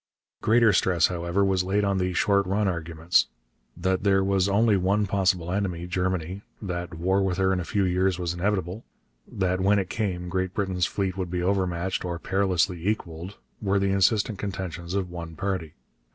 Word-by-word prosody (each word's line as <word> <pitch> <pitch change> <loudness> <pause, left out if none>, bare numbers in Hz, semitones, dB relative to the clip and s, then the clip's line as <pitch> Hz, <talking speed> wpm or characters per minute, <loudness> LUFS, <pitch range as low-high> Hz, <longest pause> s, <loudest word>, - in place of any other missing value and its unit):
Greater 115 -1 +4
stress, 90 -3 +3
however, 85 +2 0
was 95 -2 +2
laid 100 +3 +1
on 100 -1 +1
the 90 0 0
'short 100 +2 +2
run' 100 +2 +1
arguments. 85 -1 +1 0.5
That 95 +1 0
there 95 -1 +3
was 95 0 +2
only 105 +2 +4
one 100 +3 +2
possible 95 -3 +1
enemy, 90 -3 -2
Germany; 90 0 -2 0.2
that 90 -3 -5
war 95 +4 +1
with 95 -2 0
her 95 0 +2
in 95 - 0
a - - -2
few 100 +3 0
years 90 0 +1
was 90 -1 -2
inevitable; 95 +2 -2 0.5
that 95 -1 0
when 100 +2 +4
it 95 -2 -2
came 90 -5 -2
Great 95 0 -2
Britain's 95 -4 0
fleet 95 -2 -2
would 95 -2 -3
be 90 0 -2
overmatched, 95 -1 0
or 85 -1 -3
perilously 95 -1 0
equalled, 90 -2 -4 0.2
were 100 -1 +1
the 100 0 +1
insistent 100 +1 +2
contentions 95 -3 -4
of 95 -3 -2
one 85 -2 -7
party. 95 -4 -3
95 Hz, 180 wpm, -26 LUFS, 90-100 Hz, 0.5 s, Greater